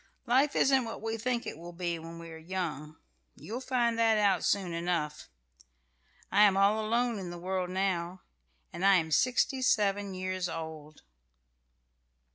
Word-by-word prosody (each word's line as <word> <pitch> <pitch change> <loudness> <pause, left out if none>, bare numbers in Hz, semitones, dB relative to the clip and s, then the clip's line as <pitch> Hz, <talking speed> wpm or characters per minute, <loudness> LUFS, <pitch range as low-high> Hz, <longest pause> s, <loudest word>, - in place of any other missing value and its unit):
Life 265 +4 +3
isn't 265 -1 +4
what 225 - -6
we 225 0 -3
think 240 +1 -2
it - - -6
will 175 +1 -9
be 170 -1 -3
when 165 +1 -9
we 165 0 -9
are - - -8
young. 160 -4 -4 0.4
You'll 235 +5 -6
find 240 -3 0
that 225 -1 +4
out 200 -4 +2
soon 190 -4 0
enough. 170 -3 -2 1.0
I 205 - +4
am 200 -2 +6
all 205 +2 +3
alone 235 0 0
in 185 -2 -6
the 175 - -7
world 185 +1 -2
now, 185 -1 -2 0.5
and 175 - -5
I 195 0 +6
am 160 -3 +1
sixty 260 - +2
seven 205 -5 +1
years 185 -1 -3
old." 155 -2 -8
190 Hz, 160 wpm, -30 LUFS, 170-225 Hz, 1.0 s, am